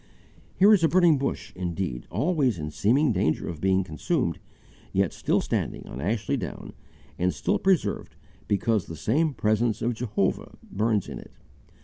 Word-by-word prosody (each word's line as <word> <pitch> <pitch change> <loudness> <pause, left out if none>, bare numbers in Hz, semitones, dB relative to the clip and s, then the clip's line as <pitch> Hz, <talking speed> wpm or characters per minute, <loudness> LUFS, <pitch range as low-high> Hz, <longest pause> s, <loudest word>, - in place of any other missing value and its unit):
Here 200 +3 +7
is 190 -5 +4
a - - +6
burning 170 -4 +4
bush 135 - -3
indeed, 90 -8 -3
always 135 - +1
in 75 -1 -5
seeming 125 - +2
danger 90 -6 0
of 80 -3 -6
being 95 0 +2
consumed, 90 - -1 0.5
yet - - +1
still - - +1
standing - - -2
on 65 - -7
Ashley 110 - -1
Down, 90 - -6 0.5
and 90 +1 +2
still 75 -2 -1
preserved 190 -3 0 0.3
because 105 -1 +1
the 80 - -7
same 145 - +1
presence 110 +1 +1
of 120 +1 0
Jehovah 105 -5 -2
burns 105 -1 0
in - - -6
it. - - -14
110 Hz, 155 wpm, -26 LUFS, 90-140 Hz, 0.5 s, Here